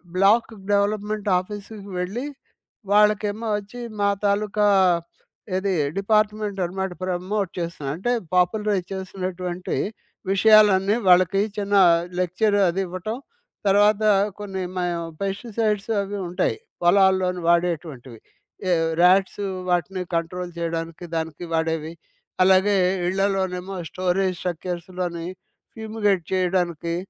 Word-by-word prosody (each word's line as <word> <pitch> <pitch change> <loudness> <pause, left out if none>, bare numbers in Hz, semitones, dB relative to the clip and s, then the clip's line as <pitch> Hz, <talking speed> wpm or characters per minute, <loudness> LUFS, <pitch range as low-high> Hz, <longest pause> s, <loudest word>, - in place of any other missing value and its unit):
Block 205 +5 +4 0.2
development 205 0 0
ఆఫీసుకు 205 +1 -9
వెళ్లి, 205 +9 -3 0.7
వాళ్ళకేమో 210 +1 +2
అచ్చి, 220 +4 -10 0.2
మా 200 - +3 0.2
తాలూకా 205 +1 +1 0.9
ఏది 195 0 0 0.2
డిపార్ట్‌మెంట్ 210 0 +1
అన్నమాట 190 +1 -3
ప్రమోట్ 185 +2 -2
చేస్తున్నారు. 160 -5 -4
అంటే 240 +7 -1 0.2
పాపులరైజ్ 195 0 +1
చేసినటువంటి 185 -1 -4 0.5
విషయాలన్నీ 205 -1 +5
వాళ్ళకి 185 +2 +5 0.2
చిన్న 205 0 -2 0.5
లెక్చర్ 200 +4 +1
అదివ్వటం. 185 +5 -3 0.5
తర్వాత 205 +2 +4 0.4
కొన్ని 195 -2 -4
మా 180 - -1 0.4
పెస్టిసైడ్స్ 210 +1 -2
అవి 200 +1 -4
ఉంటాయి. 180 +1 0 0.2
పొలాల్లోని 185 0 +3
వాడేటువంటివి. 160 -8 -1 0.5
ఏ - - +3 0.3
ర్యాట్స్ 190 +3 +4 0.3
వాటిని 180 +2 0
కంట్రోల్ 175 +2 -3
జేయడానికి 165 0 -4
దానికి 160 +1 -4
వాడేవి, 160 -1 -1 0.5
అలాగే 190 +2 +4 0.3
ఇళ్ళలోనేమో 190 0 -1
స్టోరేజ్ 185 0 0
స్ట్రక్చర్స్‌లోని 175 0 -4 0.5
ఫ్యూమిగేట్ 215 -5 0
చేయడానికి, 175 -3 0
190 Hz, 95 wpm, -23 LUFS, 180-205 Hz, 0.9 s, విషయాలన్నీ